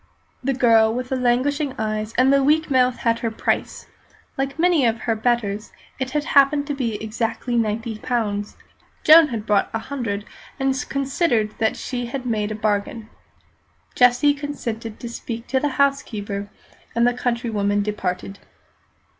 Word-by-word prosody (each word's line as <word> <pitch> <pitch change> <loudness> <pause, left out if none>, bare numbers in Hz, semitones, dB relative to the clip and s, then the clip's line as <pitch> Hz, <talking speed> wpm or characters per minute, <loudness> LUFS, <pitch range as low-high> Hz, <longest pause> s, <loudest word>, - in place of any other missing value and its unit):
The 270 +1 0
girl 225 -3 +4
with 250 +2 -4
the 265 - 0
languishing 260 +3 0
eyes 215 0 -2
and 260 +2 +5
the 275 0 +4
weak 305 +2 +2
mouth 255 -1 +3
had 230 -1 0
her 230 - -1
price, 220 - -2 0.5
like 270 +1 -3
many 340 -3 +3
of 230 -1 +1
her 225 - 0
betters, 220 -2 -1 0.3
and 260 +2 -4
it 300 - +1
happened 285 -1 +4
to 290 - -3
be 245 -6 -2
exactly 225 +3 -3
ninety 225 0 -1
pounds. 210 -4 -2 0.5
Joan 320 0 +8
had 225 -6 -5
brought 210 -2 +2
a - - +2
hundred, 225 -5 -4 0.3
and 270 0 +2 0.2
considered 270 -6 0
that 220 -1 +1
she 245 -2 -4
had 255 +1 -5
made 215 -3 -1
a - - -3
bargain. 215 +1 -2 0.8
Jessie 250 +4 +4
consented 235 -7 -5
to 240 - -6
speak 235 0 -6
to 265 - +2
the 295 - 0
housekeeper, 210 -8 -1 0.5
and 235 0 +3
the 245 - +3
countrywoman 225 -5 0
departed. 195 -1 -4
240 Hz, 155 wpm, -22 LUFS, 215-270 Hz, 0.8 s, Joan